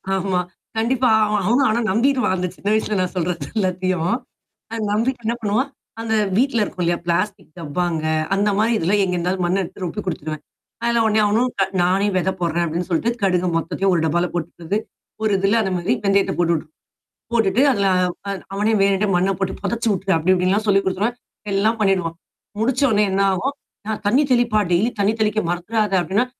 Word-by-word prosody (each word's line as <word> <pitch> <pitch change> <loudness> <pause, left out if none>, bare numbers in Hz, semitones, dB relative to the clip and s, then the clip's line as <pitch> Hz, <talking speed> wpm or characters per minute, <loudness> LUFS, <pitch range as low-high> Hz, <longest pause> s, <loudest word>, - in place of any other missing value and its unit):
ஆமா 190 -1 0 0.4
கண்டிப்பா 245 +2 +2 0.2
அவன் 210 -2 0
அவனும் 255 +5 +3
ஆனா 225 +2 +1
நம்பிருவான். 250 -2 +2
அந்தச் 180 0 -3
சின்ன 200 - -8
வயசுல 215 -1 0
நான் 185 - -2
சொல்றது 170 -4 -2
எல்லாத்தயும். 185 -2 0 0.6
அ - - -3 0.2
நம்பிட்டு 235 +3 0
என்னா 235 +2 0
பண்ணுவான்? 215 +7 0 0.3
அந்த 225 -1 -1 0.2
வீட்ல 235 -3 +2
இருக்கும் 180 -3 -3
இல்லையா 170 0 +1
பிளாஸ்டிக் 185 +1 -1
டப்பாங்க, 165 0 -2 0.3
அந்த 205 +1 +1
மாரி 225 +2 +2
இதெல்லாம் 200 +5 +1
எங்கிருந்தாவது 180 0 -1
மண்ணை 185 +3 +1
எடுத்து 185 +2 -8
ரொப்பி 210 +5 -3
கொடுத்துருவான். 155 -3 -4 0.4
அதில 235 -1 +2
உடனே 215 0 +3
அவனும் 235 +5 +2
க - - +5 0.2
"நானே 190 +3 +2
வெதை 190 +1 +1
போடுறேன்" 170 0 0
அப்டீன்னு 170 +3 -3
சொல்ட்டு, 200 +8 +1
கடுகு 180 -2 +2
மொத்தத்தையுமே 175 +4 0
ஒரு 165 - +1
டப்பால 175 +3 +1
கொட்டுறது, 175 +3 -3 0.5
ஒரு 215 -2 +2
இதில 200 +4 +2
அந்த 190 - -1
மாரி 185 +8 0
வெந்தயத்தப் 195 -2 +2
போட்டுவிட்டு 165 -3 0 0.7
போட்டுட்டு 225 +2 +2
அதில, 200 -5 +1 0.4
அ - - -1 0.2
அவனே 215 +2 +1
வேணுண்ட்டே 200 +1 +2
மண்ணப் 190 +2 +1
போட்டுப் 190 -1 -3
பொதச்சு 235 0 -1
வுட்ரு, 190 0 -1
அப்படி 180 +4 +2
இப்படின்ல்லாம் 190 +4 +1
சொல்லிக் 195 -1 +3
குடுத்துருவேன். 210 +6 -1 0.4
எல்லாம் 215 +4 +2
பண்ணீடுவான். 185 -5 +1 0.5
முடிச்சவோன்னே 240 -3 +2
என்னா 195 +1 +2
ஆகும்? 275 +9 -2 0.3
"ஆ - - +1 0.2
தண்ணீ 260 +8 +4
தெளிப்பா 235 -3 +2
டெய்லி 200 +8 +3
தண்ணீ 205 +2 +2
தெளிக்க 215 0 +2
மறந்துறாத" 205 +4 -1
அப்டீன்னா, 195 +9 +1
195 Hz, 175 wpm, -21 LUFS, 180-220 Hz, 0.7 s, க